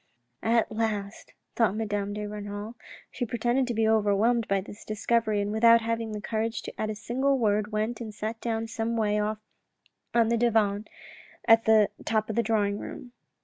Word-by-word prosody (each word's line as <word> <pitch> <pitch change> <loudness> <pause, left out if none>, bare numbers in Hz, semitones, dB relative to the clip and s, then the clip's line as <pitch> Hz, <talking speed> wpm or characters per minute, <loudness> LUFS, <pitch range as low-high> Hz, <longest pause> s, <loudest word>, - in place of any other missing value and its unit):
" 120 - -49 0.2
At 230 - +1
last," 215 -2 -3 0.2
thought 220 -4 +2
Madame 205 -2 -2
de 210 0 -4
Renal. 205 +1 -6 0.4
She 250 - -4
pretended 240 +2 0
to 240 - -2
be 220 0 +2
overwhelmed 220 +2 +2
at 195 -1 +1
this 205 - -11
discovery, 215 0 0
and 200 +1 -2
without 230 +1 +6
having 230 0 -2
the 210 - -4
courage 225 +1 -2
to - - -7
add 215 - -1
a 215 - -3
single 265 +6 0
word, 210 -2 +1
went 215 +3 -2
and 220 -2 -5
sat 220 +2 -5
down 225 -1 -1
some 225 +1 -2
way 210 -1 +1
off 210 +1 -1 0.8
on 230 -1 +4
the 235 - +2
divan 215 -3 +2 0.6
at 225 -1 +6
the 220 -2 +5
bottom 220 -1 0
of - - -5
the 235 - +3
drawing 210 -2 0
room. 255 -5 -8
220 Hz, 190 wpm, -27 LUFS, 210-230 Hz, 0.8 s, without